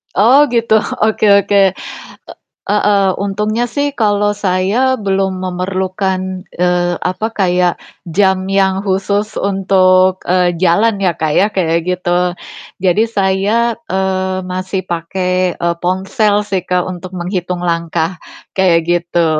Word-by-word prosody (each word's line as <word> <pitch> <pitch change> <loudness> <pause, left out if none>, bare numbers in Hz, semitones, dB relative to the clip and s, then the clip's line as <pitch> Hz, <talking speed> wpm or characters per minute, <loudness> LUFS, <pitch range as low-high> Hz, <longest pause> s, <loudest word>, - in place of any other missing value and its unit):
Oh 260 +9 +5
gitu, 230 -3 +2 0.2
oke 220 0 +1 0.2
oke, 205 - +1 1.1
e - - +1
heeh, 205 -1 +2
untungnya 210 +4 -1
sih 285 0 +1
kalau 205 -2 +1
saya 190 +1 0 0.3
belum 190 -1 0
memerlukan, 185 0 -3
eee, 175 0 0
apa, 185 +4 -2
kayak 180 -3 +1 0.3
jam 190 +2 +1
yang 195 0 +1
khusus 200 +2 -1
untuk, 185 -1 +2
eee, 180 -1 +2
jalan 200 +4 +2
ya, 180 -4 0
Kak, 155 -1 -1
ya 200 - +3
kayak 170 -5 0
gitu. 180 0 0 0.5
Jadi 185 +4 +3
saya, 205 +3 +1 0.2
eee, 190 0 -1
masih 185 +1 -3
pakai, 180 +1 -2
eee, 170 0 -1
ponsel 195 +3 0
sih, 195 -3 -1
Kak, 180 -1 +1
untuk 185 +1 -9
menghitung 180 0 -3
langkah 170 +1 -2 0.3
kayak 180 -3 +3
gitu. 175 -1 0
190 Hz, 125 wpm, -15 LUFS, 180-200 Hz, 1.1 s, Oh